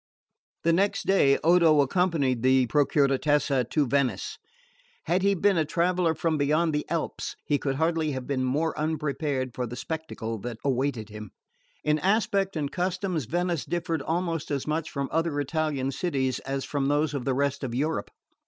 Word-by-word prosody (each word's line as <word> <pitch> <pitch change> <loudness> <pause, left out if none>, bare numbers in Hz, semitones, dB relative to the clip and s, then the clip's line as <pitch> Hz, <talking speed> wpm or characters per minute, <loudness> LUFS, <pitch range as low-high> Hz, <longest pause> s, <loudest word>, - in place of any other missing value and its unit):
The 165 - +3
next 195 +4 +1
day 140 -8 +4
Odo 165 -2 +5
accompanied 140 -5 +1
the 130 0 +4
Procuratessa 140 -1 +2
to 150 -2 +2
Venice. 140 - -1 0.6
Had 180 +2 +1
he 200 +1 +3
been 195 -1 +3
a - - +3
traveller 170 +1 +1
from 160 0 0
beyond 155 +3 +2
the 150 - -2
Alps 165 -2 -3
he 145 -1 +1
could 135 -1 -1
hardly 160 0 +1
have 130 -1 -4
been 130 -1 -1
more 150 +6 0
unprepared 145 -4 -1
for 125 0 -3
the 120 - -7
spectacle 140 -7 -5
that 115 +2 -6
awaited 130 -4 0
him. 105 -1 -8 0.5
In 150 0 +2
aspect 195 +1 +1
and 145 -3 -2
customs 180 - -1
Venice 175 +3 -1
differed 170 -2 -2
almost 165 -1 -2
as 140 -2 -2
much 155 +1 -2
from 140 0 -3
other 165 -2 0
Italian 145 -2 -1
cities 135 -4 -1
as 135 0 -4
from 140 -2 -1
those 145 +1 +1
of 140 -3 -3
the 130 0 0
rest 140 +1 0
of 120 -3 -3
Europe. 155 +5 -1
150 Hz, 170 wpm, -27 LUFS, 135-165 Hz, 0.6 s, Odo